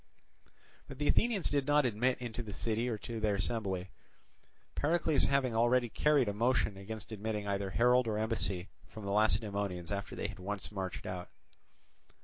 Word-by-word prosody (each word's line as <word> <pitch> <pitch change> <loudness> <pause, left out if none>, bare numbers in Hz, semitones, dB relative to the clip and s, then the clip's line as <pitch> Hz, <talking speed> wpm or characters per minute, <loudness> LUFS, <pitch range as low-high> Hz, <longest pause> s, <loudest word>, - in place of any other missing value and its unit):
But 135 - -9
the 145 +1 -1
Athenians 225 -5 +2
did 140 -1 0
not 145 -1 +4
admit 125 +2 +1
into 120 -1 -5
the 105 -3 -7
city 115 +4 -1
or 115 - -2
to 115 +2 -6
their 105 -2 +1
assembly, 95 -3 -2 0.8
Pericles 160 -1 +3
having 135 -3 +2
already 120 +1 +3
carried 145 0 +3
a 105 - 0
motion 115 -1 +1
against 105 +3 -8
admitting 105 -1 -3
either 100 -1 -1
herald 125 +4 +4
or 110 -1 0
embassy 105 -4 0 0.2
from 110 -2 -9
the 100 - -2
Lacedaemonians 100 -3 +1
after 100 0 -3
they - - -4
had 105 -1 -9
once 100 +2 -4
marched 95 -3 -4
out. 90 -1 -5
110 Hz, 165 wpm, -33 LUFS, 100-125 Hz, 0.8 s, not